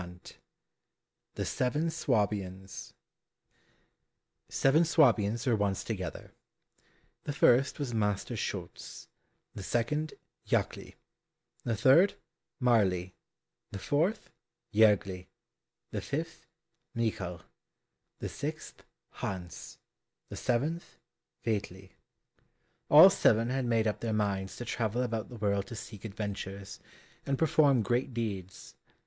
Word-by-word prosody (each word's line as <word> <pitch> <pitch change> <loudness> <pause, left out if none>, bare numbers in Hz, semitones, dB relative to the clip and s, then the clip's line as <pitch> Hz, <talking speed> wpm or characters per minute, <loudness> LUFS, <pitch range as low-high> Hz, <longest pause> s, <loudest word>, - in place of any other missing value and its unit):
119 90 0 -12 1.0
The - - -2
Seven 150 +6 0
Swabians 100 -8 -2 1.5
Seven 145 +5 +4
Swabians 120 -9 +3
were 120 -3 +3
once 100 -2 0
together. 95 -6 -5 0.9
The 145 - -2
first 135 0 +4
was 140 -5 -3
Master 105 -3 0
Schulz; - - -6 0.4
the - - -7
second, 150 +10 -1 0.3
Jackli; - - -1 0.7
the 115 - 0
third, 135 - +5 0.4
Marli; 95 -8 +2 0.6
the - - -6
fourth, 160 - 0 0.4
Jergli; 100 -4 +3 0.6
the - - -3
fifth, 160 +3 -5 0.5
Michal; 95 -7 -2 0.8
the - - -4
sixth, - - -6 0.3
Hans; 90 -4 -6 0.5
the - - -7
seventh, 150 +8 -1 0.5
Veitli: 95 -4 -3 1.0
all - - +10
seven 115 +3 +3
had 135 -1 0
made 115 -2 +2
up 105 - 0
their 115 -2 -2
minds 100 -2 -1
to 120 - -6
travel 120 +1 -1
about 115 -3 -3
the 125 - -9
world 100 -3 0
to 115 - -7
seek 105 -2 -9
adventures, 100 -2 -6 0.4
and 135 - -1
perform 145 -6 +4
great 125 +2 0
deeds. 100 -6 -5
110 Hz, 105 wpm, -30 LUFS, 100-130 Hz, 1.5 s, all